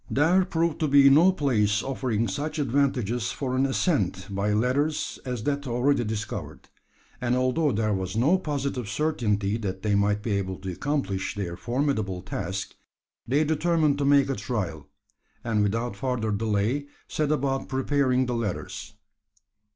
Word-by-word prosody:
There 170 +7 +3
proved 165 -2 0
to 155 - +1
be 140 -1 +7
no 165 +7 +6
place 110 - +1
offering 125 -4 -1
such 145 +12 -3
advantages 125 -4 0
for 130 -2 -3
an 135 +1 +2
ascent 100 - 0
by 100 +2 0
ladders 130 +8 0
as 125 -4 -3
that 140 +1 -1
already 125 +2 +2
discovered; 110 -1 -5 0.5
and 125 0 +1
although 130 +4 +2
there 110 -1 0
was 95 +1 -3
no 155 +11 +4
positive 140 - -3
certainty 110 -7 0
that 95 -3 -4
they 105 -1 +1
might 105 +1 +2
be 115 - -2
able 95 -2 -1
to 95 -1 -4
accomplish 100 - -2
their 90 -4 -3
formidable 110 -4 -1
task, - - -4 0.5
they 140 +6 +3
determined 155 -1 +1
to 140 - +1
make 140 -1 +5
a - - -1
trial, 95 - -4 0.6
and 110 -3 +1
without 115 +2 -1
further 115 -1 -1
delay 110 +6 0 0.2
set 150 -1 -1
about 135 -2 -1
preparing 130 -1 +1
the 125 - -2
ladders. 115 -5 -4
125 Hz, 150 wpm, -26 LUFS, 105-140 Hz, 0.6 s, be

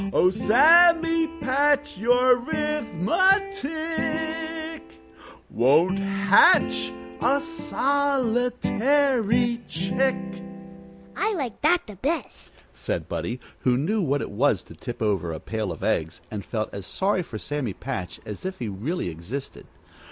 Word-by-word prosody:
Oh, 180 - +4
Sammy 330 - +5
Patch, 290 +2 +1
your 245 +3 +4
'rithmetic 320 - -1 0.7
Won't 155 +11 +3
hatch 200 - +4 0.3
a 280 - +3
solitary 260 -5 +1
chick." 190 +10 0 1.0
"I 425 0 0
like 260 - -5
that 350 +4 +3
the 210 -3 -11
best," 300 - -5
said - - -4
Buddie, 120 +2 -4 0.2
who 125 -1 +1
knew 200 +11 0
what 145 -4 0
it - - -7
was 130 +8 +1
to - - -14
tip 120 -3 -6
over 95 -5 0
a 80 - -5
pail 110 0 -4
of 80 - -8
eggs, 80 +1 -1
and 105 -2 -5
felt 110 0 -4
as 100 -1 -7
sorry 190 -1 0
for 125 -10 -7
Sammy 135 -3 -4
Patch 110 -9 -6
as 105 -2 -7
if 190 0 -4
he 120 - -4
really 115 - -3
existed. 85 - -7
235 Hz, 120 wpm, -24 LUFS, -, 1.0 s, Sammy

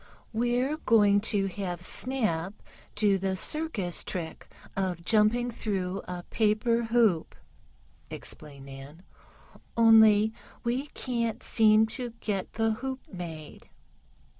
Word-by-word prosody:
"We're 245 +6 0
going 205 -7 +4
to 200 -3 +1
have 180 -2 -4
Snap 210 -7 0 0.4
do 205 -2 +3
the 190 0 -1
circus 210 - -1
trick 165 -3 -5 0.3
of 180 -3 -2
jumping 230 +3 +3
through 195 -4 -3
a 180 -1 -6
paper 230 +2 +1
hoop," 225 -8 +2 0.7
explained 140 -3 -5
Nan. 140 +5 -11 0.7
"Only 220 -1 +6 0.3
we 250 +4 -1
can't 235 -3 -2
seem 220 -1 +4
to 235 +1 -6
get 195 -3 -3
the 225 0 +1
hoop 260 +4 -4
made." 165 -4 -8
215 Hz, 110 wpm, -28 LUFS, 180-235 Hz, 0.7 s, Only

